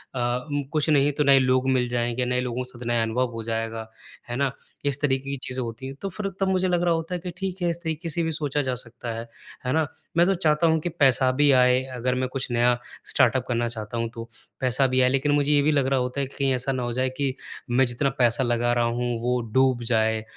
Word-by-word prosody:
अ, 125 0 -1
उम, 145 0 -1
कुछ 155 0 +1
नहीं 145 -1 +4
तो 150 - +5
नए 140 -1 +6
लोग 130 0 +2
मिल 125 -2 +2
जाएँगे 120 +1 -1
नए 125 0 0
लोगों 125 0 -3
के 125 - -7
साथ 120 -1 -10
नया 120 -1 +2
अनुभव 120 +2 0
हो 115 - -5
जाएगा, 115 0 -3 0.4
है 120 - -3
ना? 140 0 +1 0.3
इस 140 0 0
तरीक़े 135 -1 0
की 140 - -2
चीज़ें 130 0 -2
होती 115 +2 -7
हैं 135 - -7
तो 195 - -3
फिर 195 +2 -4
तब 195 - +1
मुझे 185 0 +2
लग 175 -1 +1
रहा 175 -1 +3
होता 165 +2 -3
है - - -3
कि 180 +1 -6
ठीक 190 -1 -4
है 175 - +1
इस 170 - -2
तरीक़े 160 0 -3
से 165 +2 -1
भी 160 - -1
सोचा 145 -2 -1
जा 130 -2 -1
सकता 120 0 -7
है, 115 - -6 0.4
है 125 - 0
ना? 160 -2 +2 0.3
मैं 170 - +6
तो 195 - +3
चाहता 160 -1 +2
हूँ 160 0 +3
कि 175 - -3
पैसा 135 -5 +3
भी 145 -1 +6
आए 125 0 +4
अगर 125 +1 0
मैं 130 0 -1
कुछ 135 -1 -3
नया 120 +1 +3 0.3
स्टार्टअप 130 -1 +3
करना 120 -1 0
चाहता 110 0 -5
हूँ 115 0 -1
तो, 115 0 -8 0.3
पैसा 130 +1 +2
भी 130 0 +2
आए, 125 - +4
लेकिन 135 +2 +1
मुझे 145 0 +2
ये 145 -1 +5
भी 150 - +3
लग 140 -3 +2
रहा 135 -1 +2
होता 125 +2 -2
है - - 0
कहीं 135 0 0
ऐसा 125 +2 -1
ना 130 -2 -2
हो 120 - -2
जाए 130 +1 0
कि, 135 -2 -1 0.3
मैं 125 +2 +4
जितना 120 +3 0
पैसा 120 +1 +3
लगा 120 0 +1
रहा 120 -1 +2
हूँ 120 +1 -1
वो 125 0 +1
डूब 130 -2 +3
जाए, 110 -1 +1
130 Hz, 260 wpm, -25 LUFS, 120-145 Hz, 0.4 s, नए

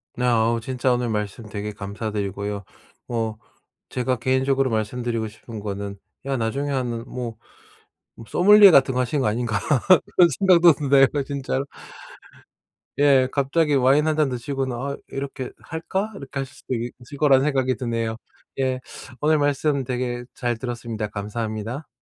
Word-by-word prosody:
네. 125 - -1
어 115 0 +2
진짜 130 +1 0
오늘 120 -1 -1
말씀 105 +1 -3
되게 105 0 -4
감사드리고요. 100 0 -4 0.4
뭐 115 -2 -2 0.5
제가 125 0 -1
개인적으로 130 +2 +1
말씀드리고 115 +1 -2
싶은 110 +1 -10
거는 100 -1 -5 0.3
야 135 -1 -1
나중에 135 +6 -1
하는 120 -3 -2
뭐 120 -3 -5 0.8
뭐 115 - -11
소믈리에 205 +1 +8
같은 135 -3 +5
거 125 - +1
하시는 135 +3 0
거 110 - +1
아닌가 110 -1 0 0.6
그런 175 -2 +7
생각도 175 -3 +7
드네요 140 -2 +4 0.2
진짜로. 140 -1 -2 1.3
예. 135 -3 +5
갑자기 145 +2 +1
와인 135 +4 +4
1 155 - +2
잔 150 -3 +3
드시고는 130 +1 -3
'아 140 +3 -4
이렇게 135 -2 -5
할까?' 190 +6 -3
이렇게 135 -2 -6
하실 135 -1 -6
수도 - - -6
있을 120 +3 -6
거라는 140 -2 +5
생각이 130 -3 +1
드네요. 115 -2 -2 0.4
예. 130 -1 0 0.4
오늘 155 +1 +3
말씀 145 -1 +1
되게 125 -1 -3
잘 120 -2 -2
들었습니다. 120 -3 -4
감사합니다. 110 +5 -4
125 Hz, 325 characters per minute, -23 LUFS, 115-140 Hz, 1.3 s, 소믈리에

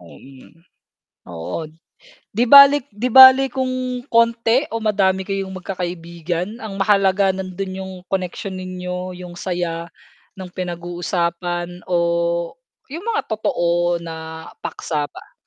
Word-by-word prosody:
Mm. 130 - -16 0.7
Oo. 85 - -5 0.7
'Di 230 +4 +2
balik 280 0 +9
'di 235 +5 -2
bale 265 +2 +9
kung 255 -1 -3
konti 230 +3 +3
o - - 0
madami 190 -3 +1
kayong 195 -1 -3
magkakaibigan, 175 +1 -4
ang 205 -3 -6
mahalaga 195 -1 +3
nando'n 190 0 -5
yung 190 0 -7 0.2
connection 190 +1 -3
ninyo, 180 0 -5
yung 180 -1 -9
saya 175 -2 -3 0.5
no'ng 185 -2 -9
pinag-uusapan 175 0 -3
o, 170 -1 0 0.4
yung 340 +6 -6
mga 440 - 0
totoo 175 -5 0
na 160 -1 -8 0.2
paksa 150 -2 -3
pa. - - -14
185 Hz, 115 wpm, -20 LUFS, 170-210 Hz, 0.7 s, balik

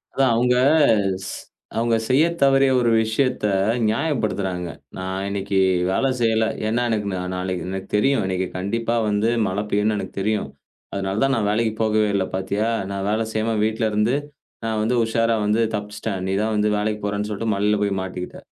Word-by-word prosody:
அதான் 135 -2 +3
அவங்க 125 +2 +3 0.7
ஸ் - - -5 0.4
அவங்க 115 0 +2
செய்ய 135 +4 +4 0.2
தவறிய 135 -1 +5
ஒரு 120 -1 +2
விஷயத்த 120 +2 0 0.4
நியாயப்படுத்துறாங்க. 105 - -1 0.3
நான் 95 +1 -3
இன்னைக்கு 100 -1 -1 0.3
வேலை 135 +8 +1
செய்யல. 110 -1 +2 0.2
ஏன்னா 115 +3 +1
எனக்கு 105 -2 -1
நா 90 - -2
நாளைக்கு 90 -1 -3
எனக்கு 95 0 -5
தெரியும் 130 +2 +2
இன்னைக்கு 95 0 -1
கண்டிப்பாவந்து 110 +1 0 0.2
மழை 95 +3 -1
பெய்யும்னு 105 +1 +1
எனக்கு - - -6
தெரியும். 105 +1 -1 0.4
அதனால 100 +2 -2
தான் 135 0 +2
நான் 105 -2 0
வேலைக்குப் 110 0 0
போகவே 110 -1 +2
இல்ல, 95 -1 +1
பார்த்தியா! 100 +4 -1 0.2
நான் 100 0 -3
வேலை 110 +2 0
செய்யாம 110 0 0
வீட்ல 110 0 0
இருந்து 105 +5 +2 0.5
நான் 110 -1 -1
வந்து 115 +3 +1
உஷாரா 115 0 +1
வந்து 105 +2 +2
தப்பிச்சுட்டேன். 105 -1 -4
நீ - - -1
தான் 110 0 0
வந்து 105 0 +2
வேலைக்குப் 105 0 -2
போறேன்னு 105 0 -2
சொல்லிட்டு 110 +1 -1
மலையில 105 +1 +2
போய் 100 -2 0
மாட்டிக்கிட்ட. 90 -1 -6
105 Hz, 165 wpm, -22 LUFS, 100-115 Hz, 0.7 s, தவறிய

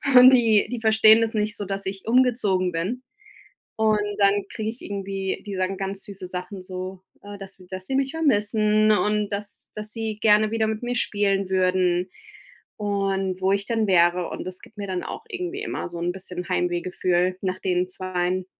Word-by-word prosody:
und 250 +1 +10
die 225 -4 +4
die 245 -2 -4
verstehen 220 0 +6
das 225 -1 0
nicht 210 0 -1
so, 205 - -5
dass 195 0 -4
ich 195 0 -5
umgezogen 225 -7 +2
bin. 185 +10 -3 0.8
Und 215 -1 +3 0.2
dann 200 0 +3
kriege 220 0 -3
ich 235 +3 -8
irgendwie 195 -1 -4
die 200 - -4
sagen 185 +1 -1
ganz 195 0 -4
süße 195 -2 -9
Sachen, 185 +1 -6
so, 185 0 -7 0.2
äh, 205 0 -9
dass 195 0 -10
dass 185 0 -7
sie 265 - -2
mich 270 0 +1
vermissen 215 -7 +2
und 210 0 +1
dass 205 0 -7
dass 210 0 -7
sie 220 -2 -4
gerne 215 0 +4
wieder 225 -1 +1
mit 220 +1 -3
mir 245 0 -2
spielen 200 -4 0
würden 185 -1 +1 0.7
und 195 -2 -1
wo 190 +1 +2
ich 200 0 0
denn 225 -2 0
wäre, 175 -1 +3
und - - -6
das 185 0 -7
gibt 215 - -17
mir 200 -1 -5
dann 185 -1 -3
auch 450 - -7
irgendwie 370 0 -4
immer 415 - -4
so 175 - -8
‘n 175 +1 -1
bisschen 180 -1 -7
Heimweh-Gefühl 180 0 0
nach 185 -1 -2
den 180 -1 0
2. 185 0 -2
200 Hz, 185 wpm, -24 LUFS, 185-215 Hz, 0.8 s, und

